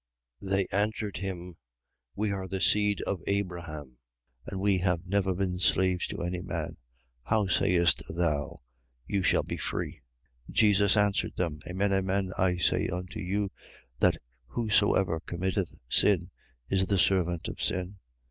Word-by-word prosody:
8:33. 95 Hz, -, -7 dB
They 95 Hz, -1 st, +2 dB
answered 105 Hz, +1 st, -1 dB
him: 90 Hz, -3 st, -5 dB, 0.6 s
We 105 Hz, 0 st, 0 dB
are 95 Hz, -1 st, -3 dB
the 95 Hz, 0 st, -3 dB
seed 105 Hz, +1 st, +3 dB
of 95 Hz, -4 st, -2 dB
Abraham: 85 Hz, -9 st, -3 dB, 0.5 s
and 95 Hz, -, -4 dB
we 100 Hz, -1 st, +2 dB
have 90 Hz, -2 st, 0 dB
never 95 Hz, 0 st, +1 dB
been 90 Hz, -1 st, -1 dB
slaves 95 Hz, -1 st, +2 dB
to -, -, -5 dB
any 90 Hz, +1 st, -2 dB
man. 85 Hz, -4 st, -4 dB, 0.4 s
How 110 Hz, -, +1 dB
sayest 85 Hz, -2 st, +3 dB
thou: 80 Hz, -4 st, -1 dB, 0.4 s
You 100 Hz, -, 0 dB
shall -, -, +3 dB
be -, -, -4 dB
free? -, -, -4 dB, 0.5 s
8:34. -, -, -9 dB
Jesus 105 Hz, -1 st, +5 dB
answered 105 Hz, -1 st, +1 dB
them: 80 Hz, -4 st, -2 dB
Amen, 95 Hz, +2 st, 0 dB
amen, 95 Hz, 0 st, 0 dB
I 90 Hz, -1 st, +2 dB
say 85 Hz, -, +2 dB
unto 90 Hz, 0 st, -5 dB
you 100 Hz, +1 st, -1 dB, 0.5 s
that -, -, +4 dB, 0.3 s
whosoever 100 Hz, -, +2 dB
committeth 90 Hz, +2 st, -2 dB
sin 90 Hz, +5 st, +3 dB, 0.4 s
is 95 Hz, -1 st, +1 dB
the 100 Hz, -, +2 dB
servant 90 Hz, -3 st, +2 dB
of -, -, -6 dB
sin. 90 Hz, +2 st, -2 dB
95 Hz, 145 wpm, -29 LUFS, 90-100 Hz, 0.6 s, Jesus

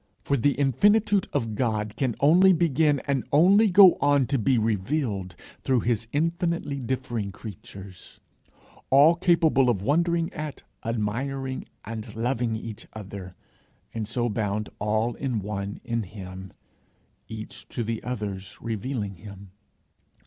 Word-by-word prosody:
For 140 Hz, -, +1 dB
the 140 Hz, +2 st, +2 dB
infinitude 205 Hz, -, +3 dB
of 115 Hz, -6 st, -1 dB
God 105 Hz, -2 st, -1 dB
can 125 Hz, -3 st, -1 dB
only 180 Hz, +6 st, +6 dB
begin 155 Hz, -4 st, +2 dB
and 135 Hz, -3 st, 0 dB
only 195 Hz, +9 st, +5 dB
go 190 Hz, -1 st, +7 dB
on 145 Hz, -2 st, +3 dB
to 135 Hz, -, +3 dB
be 125 Hz, +3 st, +2 dB
revealed, 105 Hz, -, -1 dB, 0.3 s
through 130 Hz, -3 st, +1 dB
his 115 Hz, -1 st, -1 dB
infinitely 165 Hz, -1 st, -1 dB
differing 120 Hz, -5 st, -3 dB
creatures 95 Hz, -2 st, -11 dB, 0.7 s
all 145 Hz, +5 st, +7 dB
capable 165 Hz, -7 st, +3 dB
of 100 Hz, -5 st, 0 dB
wondering 165 Hz, -, +1 dB
at, 150 Hz, -2 st, -6 dB, 0.2 s
admiring, 130 Hz, +4 st, -3 dB, 0.2 s
and 110 Hz, -1 st, -7 dB
loving 120 Hz, 0 st, -1 dB
each 110 Hz, -1 st, -8 dB
other, 100 Hz, -3 st, -8 dB, 0.6 s
and 110 Hz, -2 st, -3 dB
so 120 Hz, +2 st, -1 dB
bound 105 Hz, -1 st, -2 dB
all 110 Hz, +3 st, 0 dB
in 130 Hz, -3 st, -2 dB
one 100 Hz, 0 st, -4 dB
in 115 Hz, 0 st, -1 dB
him, 95 Hz, -2 st, -9 dB, 0.8 s
each 110 Hz, -1 st, -7 dB
to 120 Hz, -, -3 dB
the 115 Hz, 0 st, -3 dB
others 100 Hz, -6 st, -5 dB
revealing 110 Hz, -3 st, -4 dB
him. 100 Hz, +1 st, -12 dB
120 Hz, 130 wpm, -26 LUFS, 105-145 Hz, 0.8 s, go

